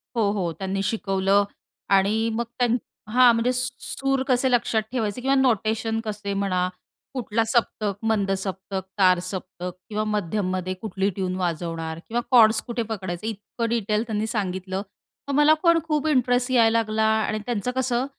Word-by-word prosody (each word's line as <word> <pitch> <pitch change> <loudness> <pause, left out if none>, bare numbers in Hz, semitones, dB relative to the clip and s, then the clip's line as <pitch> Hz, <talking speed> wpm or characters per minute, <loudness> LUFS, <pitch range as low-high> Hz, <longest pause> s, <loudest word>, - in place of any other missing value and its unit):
हो, 220 -3 +2
हो 185 -5 -1
त्यांनी 195 0 -2
शिकवलं 195 -1 +2 0.5
आणि 215 +4 +2
मग 235 +2 0 0.2
त्यां 240 -1 +3 0.4
हां 250 -1 +7
म्हणजे 230 +2 +1
स 250 0 +1
सूर 270 -1 -1
कसे 260 0 +3
लक्षात 235 -2 +2
ठेवायचे 230 -2 -2
किंवा 270 +2 +2
नोटेशन 225 -3 +1
कसे 205 -1 -3
म्हणा, 190 -2 0 0.5
कुठला 230 -3 0
सप्तक, 220 -3 +1
मंद 215 -3 +1
सप्तक, 190 0 -4 0.2
तार 185 -2 +5
सप्तक 180 -1 -5 0.2
किंवा 215 0 -1
मध्यममध्ये 185 -1 -1
कुठली 195 -2 -1
ट्यून 185 -1 -3
वाजवणार 165 -2 -3
किंवा 235 +2 -1
कॉर्ड्स 220 -3 +6
कुठे 235 -1 -2
पकडायचे, 190 -2 -4
इतकं 225 +2 -4
डिटेल 215 -2 0
त्यांनी 215 -1 -1
सांगितलं. 190 -3 -2 0.5
मग 280 - -2
मला 295 +2 +6
पण 335 -1 +5
खूप 305 -1 0
इंटरेस्ट 250 -3 +2
यायला 230 -2 +4
लागला 220 -1 0
आणि 220 0 +1
त्यांचं 240 0 -1
कसं, 255 -1 +1
215 Hz, 155 wpm, -24 LUFS, 195-240 Hz, 0.5 s, हां